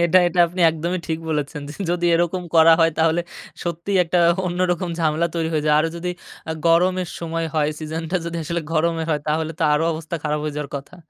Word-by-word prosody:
এটা, 170 +2 +5
এটা 175 +1 -2
আপনি 180 +2 -6
একদমই 170 +3 -3
ঠিক 160 -1 -1
বলেছেন। 150 0 -2 0.3
যদি 175 0 -1
এরকম 175 +2 0
করা 165 0 +7
হয় 165 - +5
তাহলে 160 +1 +3 0.4
সত্যিই 175 +3 -1
একটা 175 +2 0 0.3
অন্যরকম 180 0 0
ঝামেলা 160 +1 +1
তৈরি 165 -1 -1
হয়ে 155 -2 0
যায়, 150 - +4
আরও 165 - +1
যদি 180 +1 -3 0.4
আ - - 0
গরমের 180 +2 +3
সময় 165 0 -2
হয়, 150 -2 +2
সিজনটা 160 +3 -3
যদি 170 0 -4
আসলে 170 +2 -2
গরমের 165 0 0
হয়, 150 - 0
তাহলে 155 +1 0
তো - - -1
আরো 150 +2 +2
অবস্থা 160 +1 -6
খারাপ 150 0 0
হয়ে 150 -1 -3
যাওয়ার 150 -1 -4
কথা। 140 +6 -9
165 Hz, 200 wpm, -21 LUFS, 155-175 Hz, 0.4 s, করা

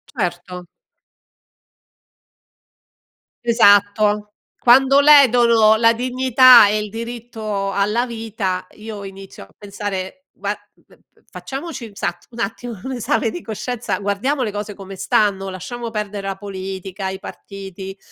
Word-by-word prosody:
Certo. 180 -3 -4 2.8
Esatto. 210 -2 +3 0.3
Quando 270 +3 +5
ledono 240 -6 +6
la 230 +1 +4
dignità 255 -1 +6
e 210 - +1
il 210 - -5
diritto 225 -3 -5
alla 210 +5 +1
vita 220 -6 -4
io 215 -1 -8
inizio 195 - -10
a 95 - -18
pensare 205 +5 -6
va - - -3 0.2
v - - -24 0.2
v - - -31
facciamoci 270 -3 -7
un 205 - -16
sat 175 -2 -4
un 235 - -12
attimo 225 0 -4
un 265 - -4
esame 225 -1 0
di 350 - -7
coscienza, 235 +2 -4
guardiamo 225 +8 -1
le 215 - -2
cose 205 0 -5
come 195 0 -10
stanno, 195 0 0
lasciamo 230 +6 -6
perdere 210 -2 -4
la 195 -1 -4
politica, 190 -1 -6
i 190 0 -6
partiti 195 -1 -9
210 Hz, 125 wpm, -19 LUFS, 195-235 Hz, 2.8 s, ledono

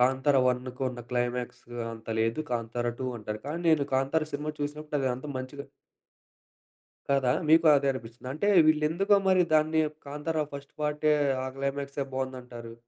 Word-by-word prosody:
"కాంతారా 130 +2 +3
1కు 125 +1 -2
ఉన్న 120 - -8
క్లైమాక్స్ 125 0 -2 0.3
అంత 110 0 -11
లేదు, 115 +6 +1
కాంతారా 120 +1 -2
2" 130 - -1
అంటారు. 105 0 -5
కానీ 160 +4 -3
నేను 150 -3 +4
కాంతారా 145 +4 +1
సినిమా 150 +2 -3
చూసినప్పుడు 150 +1 -3
అది 135 - +1
అంతా 130 +4 -7
మంచిగా 130 +2 -7 1.4
కాదా! 135 -3 +3 0.2
మీకు 160 +1 +6
అదే 140 0 0
అనిపించిందా? 120 0 -8
అంటే 200 +7 0 0.2
వీళ్ళేందుకో 160 +7 +3
మరి 185 -1 +5
దాన్ని 155 +1 +3 0.3
కాంతారా 150 +2 -2
ఫస్ట్ 140 0 -8
పార్ట్ 150 0 -1 0.4
ఆ - - -3
క్లై‌మక్సే 140 +1 -2
బాగుందంటారు. 125 -3 -5
140 Hz, 145 wpm, -28 LUFS, 125-150 Hz, 1.4 s, మీకు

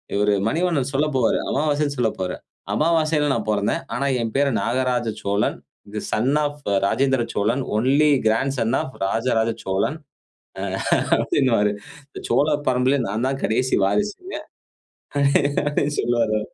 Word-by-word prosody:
இவரு, 105 0 +2 0.2
மணிவண்ணன் 160 -5 0
சொல்லப்போவாரு, 135 -5 +2
"அமாவாசைனு" 145 -1 0
சொல்லப்போவாரு. 95 -6 -1 0.4
அமாவாசைைல 155 +1 +2
நான் 110 -2 -3
பிறந்தேன். 105 -1 0
ஆனா, 140 +3 -1 0.2
என் 115 -1 -3
பெயர் 140 -1 +3
நாகராஜசோழன், 115 -4 -1 0.4
தி 105 - -2
son 130 +7 +1
of 145 0 -3 0.3
Rajendra 130 +3 +2
Cholan, 115 +6 0 0.2
only 140 +6 +3 0.2
grand 135 +5 +1
zone 115 +2 +1
of 130 - -7
Rajaraja 115 +1 +1
Cholan 95 +11 -1 1.2
அப்பிடின்னுவாரு. 115 -7 +2 0.4
இந்த - - -9
சோழ 145 - +3 0.2
பரம்பரேலே, 130 +2 +2
நான் 110 +5 -1
தான் 135 0 -3
கடைசி 125 +4 +1
வாரிசுங்க. 210 - -2 0.9
அப்பிடின்னு 145 +1 +1
சொல்லுவாரு. 115 -3 +1
130 Hz, 120 wpm, -22 LUFS, 110-145 Hz, 1.2 s, பெயர்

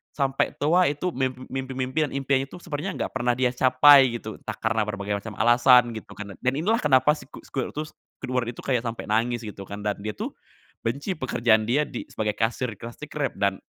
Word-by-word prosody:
sampe 135 -1 +1
tua, 170 +3 +3
itu 160 +5 -2
mim 130 0 0 0.2
mimpi-mimpi 130 +3 -1
dan - - -15
impiannya 135 0 0
itu - - -10
sepertinya 170 +3 -4
enggak - - -3
pernah 125 -2 0
dia 125 -1 +1
capai 130 0 +6
gitu, 110 -1 -7
entah 110 - -6
karena 110 0 0
berbagai 100 0 -3
macam 110 -1 -8
alasan 120 +1 +5
gitu 110 - -9
kan, 100 -2 -7
dan - - -17
dan 125 +1 +1
inilah 215 +8 +1
kenapa 140 0 +4
siku 135 -2 -11
squirtus 150 +3 -4 0.3
Squidward 125 -2 -2
itu, - - -14
kayak 125 -3 0
sampai 115 -2 -5
nangis 115 +3 +1
gitu 100 -1 -8
kan, 100 +2 -8
dan 105 0 -1
dia 110 - -2
tuh - - -6 0.5
benci 140 - -2
pekerjaan 115 -5 +2
dia 140 +7 +1
di 120 - -6
sebagai 105 -1 -2
kasir 120 +3 0
di 115 - -7
Krusty 120 +7 -9
Krab, 145 -2 -2
dan 100 -1 0
125 Hz, 205 wpm, -25 LUFS, 110-140 Hz, 0.5 s, capai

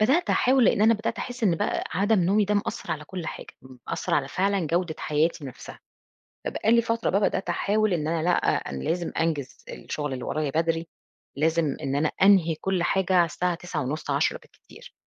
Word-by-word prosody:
بدأت 270 +11 +3
أحاول، 255 -1 +4
لإن 205 - +3
أنا 225 +1 +6
بدأت 220 +1 -3
أحس 245 -1 -6
إن 175 -6 +3
بقى - - -1
عدم 205 +2 +2
نومي 200 +4 +3
ده 210 +1 0
مأثّر 215 +3 -2
على 150 -1 -6
كل 175 -1 -6
حاجة، - - -6 0.2
م 130 0 -14
مأثّر - - -1
على 140 -2 0
فعلًا 195 +1 0
جودة 170 0 0
حياتي 155 0 0
نَفْسها، 130 - -10 0.7
فبقى 220 - 0
لي 235 0 +5
فترة 230 -1 -1
بقى 200 - +2
بدأت 195 -2 0
أحاول 205 +3 +1
إن 155 -3 -1
أنا 165 -1 -1
لأ 180 - +3 0.4
أنا 65 -1 -5
لازم 170 0 -1
أنجز 150 -5 -1
الشُغل 145 -3 -5
اللي 125 - -5
ورايا 155 -2 -1
بدري، 165 +2 0 0.5
لازم 160 -1 +1
إن 135 +1 -2
أنا 150 +2 +1
أنهي 185 -5 +5
كل 185 +2 -1
حاجة 190 +1 +1
على 175 -1 +6
الساعة 175 +2 -1
21:30 155 -4 -4
22:00 - - +1
بالكتير، - - -17
175 Hz, 195 wpm, -25 LUFS, 155-205 Hz, 0.7 s, أنا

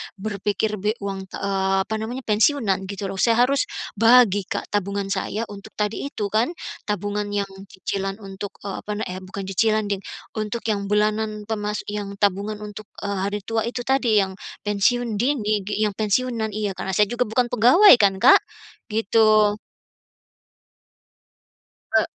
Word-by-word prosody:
berpikir 210 +1 -2
be 210 +3 0
uang, 195 -1 -4
eee, 195 0 -1
apa - - -19
namanya 240 +4 -5
pensiunan 210 -4 +2
gitu 200 0 -4
loh. 195 - -6
Saya 235 +2 +4
harus 275 +2 +1 0.3
bagi 225 -4 +5
Kak, - - -4
tabungan 200 -1 -1
saya 215 +3 -2
untuk 205 +1 -11
tadi 210 +5 -2
itu 210 -7 -4
kan 235 +11 +1 0.3
tabungan 205 0 -2
yang 200 -1 -1 0.2
cicilan 195 +1 -4
untuk, 195 +1 -7
eee, 200 -1 -4
apa 210 - -7
na 215 - -3
eh, 185 - -5
bukan 190 +1 -7
cicilan 215 +2 +2
deh 200 - 0 0.4
untuk 215 +2 -3
yang 200 -1 -2
bulanan 210 +1 0
pemas 210 -1 -3
yang 205 -1 -4
tabungan 205 +1 0
untuk, 210 0 -9 0.2
eee, 200 -1 -2
hari 205 +1 -2
tua 225 +1 -1
itu 245 +1 -4
tadi 240 -6 +3
yang 190 - -4 0.3
pensiun 215 +2 +1
dini 215 -6 0
gi 210 +1 0
yang 210 - +1
pensiunan 220 +1 -1
iya 210 -2 -1
karena 190 0 -4
saya 210 +2 +3
juga 240 0 0
bukan 240 +2 0
pegawai 250 - +7
kan 200 -2 +4
Kak, 265 - +8 0.5
gitu. 215 -1 +3 2.4
Eee, - - +5
210 Hz, 155 wpm, -23 LUFS, 200-220 Hz, 2.4 s, Kak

